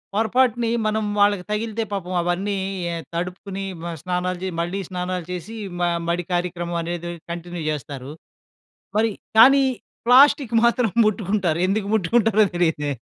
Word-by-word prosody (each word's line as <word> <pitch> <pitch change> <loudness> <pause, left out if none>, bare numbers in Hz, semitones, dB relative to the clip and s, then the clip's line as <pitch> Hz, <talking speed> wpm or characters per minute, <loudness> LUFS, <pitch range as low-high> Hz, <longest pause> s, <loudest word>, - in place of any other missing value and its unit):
పొరపాటున 235 +2 +2 0.2
మనం 215 0 0 0.2
వాళ్ళకి 205 -2 +3
తగిలితే 220 +1 -1
పాపం 185 -2 -4
అవన్నీ 180 +4 -1 0.3
య 170 - -2 0.2
తడుపుకుని 185 +3 -4 0.2
మ 170 - -4
స్నానాలు 180 0 -2
చే 190 - -2
మళ్ళీ 175 +4 -2
స్నానాలు 180 -1 -3
చేసి 180 +4 -6 0.3
మ - - -2 0.3
మడి 170 +1 0
కార్యక్రమం 175 -1 -2
అనేది 170 +1 -4 0.2
కంటిన్యూ 175 0 -6
చేస్తారు. 140 -2 -5 0.9
మరి 225 +1 +3 0.3
కానీ, 270 +5 +8 0.4
ప్లాస్టిక్ 255 0 +6
మాత్రం 235 -1 +3 0.2
ముట్టుకుంటారు. 195 -5 0
ఎందుకు 200 +1 0
ముట్టుకుంటారో 220 +2 +3
తెలియదు. 160 -4 +1
185 Hz, 130 wpm, -22 LUFS, 175-220 Hz, 0.9 s, కానీ